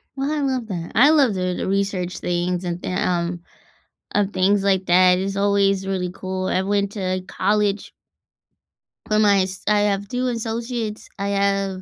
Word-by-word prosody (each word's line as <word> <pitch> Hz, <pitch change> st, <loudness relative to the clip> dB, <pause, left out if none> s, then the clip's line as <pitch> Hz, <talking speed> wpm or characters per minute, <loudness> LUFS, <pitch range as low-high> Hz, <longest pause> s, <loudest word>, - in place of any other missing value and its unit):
Well, 275 Hz, +2 st, -2 dB
I 300 Hz, -1 st, -1 dB
love 260 Hz, -4 st, -1 dB
that. 170 Hz, -4 st, -5 dB
I 275 Hz, +8 st, +6 dB
love 275 Hz, -9 st, +4 dB
doing 180 Hz, -1 st, -1 dB
the -, -, -3 dB
research 195 Hz, -2 st, -1 dB
things 175 Hz, +1 st, -1 dB
and 175 Hz, 0 st, -4 dB
the, -, -, -4 dB
um 175 Hz, -1 st, -1 dB, 0.7 s
of 205 Hz, -1 st, +1 dB
things 195 Hz, +1 st, +2 dB
like 190 Hz, -1 st, +1 dB
that. 180 Hz, +1 st, +5 dB
It's 195 Hz, +1 st, -3 dB
always 200 Hz, -1 st, +2 dB
really 180 Hz, -2 st, -2 dB
cool. 185 Hz, 0 st, -4 dB
I 185 Hz, -, 0 dB
went 200 Hz, 0 st, 0 dB
to 185 Hz, -2 st, -2 dB
college 205 Hz, +1 st, 0 dB, 1.2 s
for 215 Hz, -1 st, +2 dB
my 200 Hz, -2 st, +4 dB
s 185 Hz, 0 st, -6 dB
I 210 Hz, -1 st, +4 dB
have 200 Hz, 0 st, -3 dB
2 250 Hz, +3 st, -2 dB
associates. 230 Hz, -1 st, -4 dB
I 200 Hz, 0 st, -1 dB
have 195 Hz, -1 st, 0 dB
195 Hz, 175 wpm, -22 LUFS, 185-210 Hz, 1.2 s, I